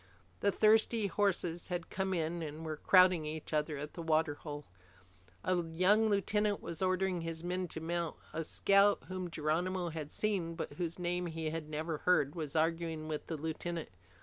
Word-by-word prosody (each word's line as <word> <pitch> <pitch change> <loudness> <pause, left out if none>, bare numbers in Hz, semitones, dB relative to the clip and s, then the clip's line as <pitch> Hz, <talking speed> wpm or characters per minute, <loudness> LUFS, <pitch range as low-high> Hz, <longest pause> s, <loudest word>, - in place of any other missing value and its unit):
The 200 - +3
thirsty 220 +1 +4
horses 180 -3 0
had 175 -1 -4
come 190 0 -1
in 170 -1 -1
and 155 +1 -6
were 155 -1 -3
crowding 185 -2 +5
each 155 +1 -6
other 150 0 0
at 150 +2 -6
the 170 - -6
water 160 -2 +2
hole. 145 -1 -7 0.8
A 185 - +2
young 185 +7 +3
lieutenant 205 0 +1
was 165 0 -6
ordering 185 -1 +1
his 165 0 -5
men 180 +1 -1
to 160 - -6
mount. 170 0 -2 0.2
A 165 +1 -2
scout 200 +5 +4
whom 185 -1 -4
Geronimo 170 +3 -1
had 155 -2 -6
seen, 185 -6 -1
but 165 - -5
whose 170 +2 -3
name 180 0 -1
he 160 -1 -3
had 160 -1 -5
never 155 0 -3
heard, 150 -6 +3
was 155 -4 -5
arguing 165 -1 0
with 155 -1 -4
the 160 - -3
lieutenant. 160 +2 -4
170 Hz, 175 wpm, -34 LUFS, 155-185 Hz, 0.8 s, crowding